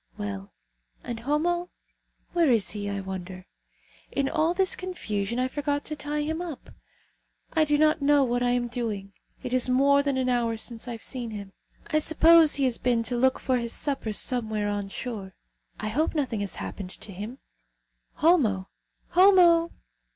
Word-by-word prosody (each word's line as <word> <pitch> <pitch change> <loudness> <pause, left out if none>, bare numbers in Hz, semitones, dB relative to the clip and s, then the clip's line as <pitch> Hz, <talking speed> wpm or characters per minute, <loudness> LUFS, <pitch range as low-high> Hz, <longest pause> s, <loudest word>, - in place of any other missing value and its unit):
Well, 200 -1 -6 0.5
and 235 -2 -5
Homo? 340 +7 -1 0.6
Where 340 -4 +3
is 230 -5 +2
he, 205 -1 -4
I 200 -1 -3
wonder? 185 -1 -7 0.7
In 275 -1 0
all 320 +4 +1
this 380 0 +3
confusion 235 - -4
I 255 0 +1
forgot 290 +1 -2
to 305 - -3
tie 295 0 -3
him 320 +3 -3
up. 335 -6 -8 0.8
I 315 -2 +3
do 295 0 +2
not 310 +1 +3
know 285 0 +4
what 245 -1 0
I 245 - +2
am 245 0 0
doing. 215 -5 -4 0.3
It 250 -1 -4
is 255 0 +2
more 280 +2 +4
than 280 -2 -1
an 260 -1 0
hour 235 -2 0
since 230 +1 -4
I 240 - -4
have 230 - -7
seen 245 -3 -4
him. 200 -3 -8 0.3
I 310 - +1
suppose 320 0 +6
he 280 - 0
has 255 -3 0
been 240 -2 +1
to 245 +2 -2
look 260 +2 +2
for 255 -1 0
his 235 -1 -2
supper 275 -6 -1
somewhere 215 -1 +2
ashore. 205 0 -5 0.4
I 215 - -3
hope 305 +9 0
nothing 260 -8 -1
has 200 -1 -3
happened 195 -3 -6
to 210 - -9
him. 210 +7 -7 0.8
Homo! 235 - +2 0.4
Homo!" 350 -3 +5
250 Hz, 175 wpm, -26 LUFS, 215-300 Hz, 0.8 s, suppose